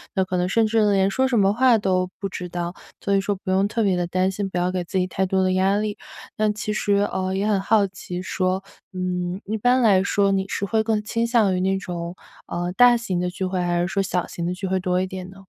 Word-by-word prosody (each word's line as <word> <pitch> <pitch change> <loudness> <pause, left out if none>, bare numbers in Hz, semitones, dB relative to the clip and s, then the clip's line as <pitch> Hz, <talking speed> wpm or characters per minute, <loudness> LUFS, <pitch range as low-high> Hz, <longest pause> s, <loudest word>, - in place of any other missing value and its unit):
那 190 - +3
可 185 - -3
能 180 0 +1
甚 225 +2 +3
至 220 0 +2
呢， 205 - +3
连 195 0 +2
说 260 +3 +2
什 245 -3 +1
么 195 0 +4
话 245 -1 +4
都 185 -2 0
不 195 - -2
知 180 -1 -6
道， 175 0 -4 0.3
所 200 - 0
以 - - +4
说 200 +1 -1
不 185 0 -5
用 195 +2 +3
特 225 +1 -1
别 190 -3 +2
地 175 -1 -1
担 185 +2 +1
心， 195 0 -3
不 180 - -4
要 180 +1 +1
给 180 -1 -2
自 190 - -3
己 180 - +2
太 190 +1 -1
多 190 0 +1
的 185 - +2
压 190 +2 +2
力。 210 -1 -2 0.4
那 215 0 +2
其 215 0 -4
实， 205 -1 0 0.2
呃， 190 0 -2
也 200 +2 0
很 205 -2 +2
好 210 0 +3
奇 180 -1 -7
说， 185 0 -1 0.3
嗯， 180 0 -2
一 215 +3 -2
般 245 +4 +3
来 200 -5 +5
说 200 0 +2
你 190 0 +1
是 200 - -2
会 220 +2 +1
更 215 -1 0
倾 230 +1 -1
向 220 -5 +3
于 - - -1
那 190 +1 +1
种， 175 -2 -5 0.3
呃， 175 +1 -3
大 245 +2 +6
型 190 -7 -2
的 180 0 -1
聚 185 +1 -4
会， 185 0 -2
还 175 0 0
是 175 - 0
说 195 +1 0
小 180 -2 -1
型 170 - -6
的 180 - -1
聚 190 - -5
会 190 0 0
多 180 0 0
一 - - 0
点 185 -1 -7
呢？ 195 0 -14
190 Hz, 295 characters per minute, -23 LUFS, 185-205 Hz, 0.4 s, 大